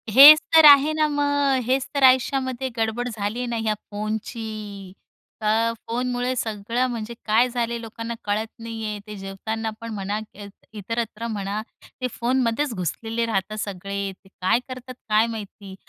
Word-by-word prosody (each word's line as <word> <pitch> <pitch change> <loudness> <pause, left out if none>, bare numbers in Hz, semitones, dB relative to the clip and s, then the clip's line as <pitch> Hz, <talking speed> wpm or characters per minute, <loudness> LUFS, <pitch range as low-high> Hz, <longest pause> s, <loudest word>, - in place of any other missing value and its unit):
हेच 300 +3 +12 0.2
तर 320 -1 +9
आहे 285 +1 +8
ना 310 0 +2
मग. 285 -2 +1
हेच 260 +2 +1
तर 280 - +1
आयुष्यामध्ये 260 0 +3
गडबड 225 +2 -1
झाली 215 +1 -3
आहे 250 - -2
ना 235 -1 -2
या 215 - +3 0.2
फोनची. 215 -2 -5 0.5
तर 225 +2 +2
फोनमुळे 245 +1 -1
सगळं, 230 +2 -1
म्हणजे 235 -1 -5
काय 230 +4 +3
झाले 235 -1 -2
लोकांना 230 +1 -6
कळत 210 +2 0
नाही 225 -1 -6
आहे. 210 -1 -4
ते 210 - -7
जेवताना 210 +3 -4
पण 230 - -6
म्हणा, 205 +1 -3
इत 200 0 -10 0.2
इतरत्र 230 +2 -4
म्हणा, 205 -1 -3 0.4
ते 255 - +1
फोनमध्येच 245 +2 0
घुसलेले 225 +5 -2
राहतात 215 -1 -2
सगळे. 200 0 -4
ते 190 0 -20
काय 190 +6 +3
करतात, 255 0 -8 0.2
काय 215 +2 +4
माहिती. 205 -3 -8
225 Hz, 155 wpm, -23 LUFS, 210-250 Hz, 0.5 s, हेच